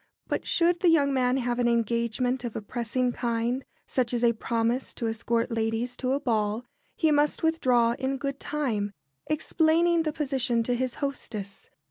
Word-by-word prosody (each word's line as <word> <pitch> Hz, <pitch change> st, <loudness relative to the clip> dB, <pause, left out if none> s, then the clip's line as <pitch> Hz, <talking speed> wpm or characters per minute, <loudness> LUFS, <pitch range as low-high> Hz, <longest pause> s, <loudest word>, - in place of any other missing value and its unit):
But -, -, -3 dB
should 345 Hz, 0 st, +3 dB
the 350 Hz, -, +4 dB
young 285 Hz, -4 st, +4 dB
man 255 Hz, 0 st, +2 dB
have 245 Hz, -1 st, -1 dB
an 240 Hz, -, +3 dB
engagement 235 Hz, +2 st, 0 dB
of 235 Hz, -3 st, -5 dB
a -, -, -3 dB
pressing 245 Hz, +3 st, -1 dB
kind, 235 Hz, +2 st, -1 dB, 0.2 s
such 250 Hz, -2 st, 0 dB
as 240 Hz, -, -1 dB
a 235 Hz, -1 st, +5 dB
promise 230 Hz, +3 st, -1 dB
to 235 Hz, -, -3 dB
escort 230 Hz, +1 st, -1 dB
ladies 225 Hz, +2 st, -1 dB
to 255 Hz, 0 st, 0 dB
a 280 Hz, -, +1 dB
ball, 220 Hz, -2 st, 0 dB, 0.3 s
he 320 Hz, -2 st, +2 dB
must 295 Hz, +1 st, +2 dB
withdraw 255 Hz, -8 st, +3 dB
in 270 Hz, 0 st, -1 dB
good 275 Hz, 0 st, -4 dB
time, 225 Hz, -9 st, -2 dB, 0.3 s
explaining 325 Hz, +2 st, +2 dB
the 310 Hz, -1 st, -1 dB
position 265 Hz, -6 st, 0 dB
to 245 Hz, -, 0 dB
his 250 Hz, 0 st, -1 dB
hostess. 210 Hz, -7 st, -6 dB
250 Hz, 170 wpm, -27 LUFS, 230-280 Hz, 0.3 s, a